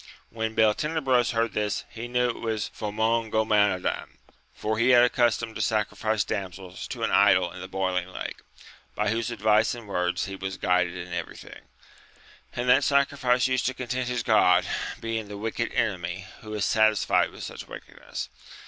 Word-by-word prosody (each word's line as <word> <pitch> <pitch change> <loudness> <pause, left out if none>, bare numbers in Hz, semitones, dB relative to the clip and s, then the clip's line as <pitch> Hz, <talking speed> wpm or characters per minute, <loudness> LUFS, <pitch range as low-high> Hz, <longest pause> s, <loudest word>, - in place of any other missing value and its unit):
When 110 -1 -3
Beltenebros 130 +3 +2
heard 115 0 0
this, 105 -1 -1
he 115 +1 -6
knew 125 0 +1
it - - -10
was 110 -2 -2
Famongomadan, 110 -2 0 0.3
for 110 +1 -3
he 120 +2 +3
had 120 -1 +7
a 125 - +3
custom 115 -2 +1
to - - -4
sacrifice 110 0 0
damsels 95 -2 -5
to - - -5
an - - +1
idol 95 -3 +4
in 90 - -9
the 95 - -6
Boiling 95 -1 -1
Lake, 95 - -6 0.6
by - - 0
whose 115 +1 -1
advice 110 0 +2
and 115 -3 -10
words 90 -2 -1
he 100 - -6
was 95 0 -5
guided 90 -1 +1
in 85 0 -7
everything, 85 -1 -7 0.9
and 120 +1 -2
that 125 - +5
sacrifice 140 -3 +2
used 130 -1 +1
to 130 - -2
content 130 0 -3
his 125 -2 -1
god, - - +4 0.3
being 115 -1 -3
the 100 0 -7
Wicked 115 +2 -2
Enemy, 95 -3 -2
who 110 - -10
is 105 - 0
satisfied 110 -2 +3
with - - -10
such - - -7
wickedness. - - -8
110 Hz, 165 wpm, -26 LUFS, 95-120 Hz, 0.9 s, had